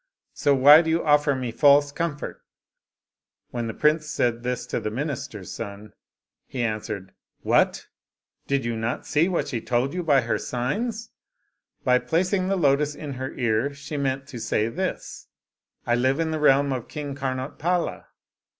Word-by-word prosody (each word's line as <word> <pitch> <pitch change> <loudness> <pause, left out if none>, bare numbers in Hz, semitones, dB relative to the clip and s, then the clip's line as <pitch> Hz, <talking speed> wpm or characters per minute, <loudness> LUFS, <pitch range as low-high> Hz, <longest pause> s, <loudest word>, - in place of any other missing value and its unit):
So 145 - +2
why 145 +4 +8
do 160 - -3
you 165 +1 +1
offer 145 -1 +4
me 125 -2 -3
false 145 +4 +5
comfort?" 150 -1 -4 1.1
When 120 -2 -3
the 110 - -4
prince 155 +1 +2
said 120 -1 0
this 125 0 -3
to - - -2
the - - -3
minii$ter's 120 - -5
son, 105 -1 -8 0.5
he 125 -3 -3
answered, 105 -4 -4
" - - -58
What! - - +3 0.6
did 140 -3 0
you 115 0 -1
not 115 +2 -3
see, 155 +4 +2
what 180 - -1
she 115 -4 -3
told 125 +5 0
you 180 - -2
by 145 -5 +4
her 115 - -1
signs? 215 - -3 0.7
By 125 -1 +4
placing 185 - 0
the 195 - +1
lotus 145 -2 +2
in 145 -1 -6
her 130 +1 -5
ear, 120 +3 0
she 145 +2 -7
meant 135 -1 -1
to 125 -5 -7
say 110 0 0
this, 185 +9 -4 0.3
' - - -51
I 120 - +1
live 130 +4 +2
in 160 -1 0
the 155 - -2
realm 140 -1 +4
of 125 -3 -5
King 145 -2 -5
Karnotpala.' 140 +6 -2
135 Hz, 170 wpm, -25 LUFS, 120-150 Hz, 1.1 s, why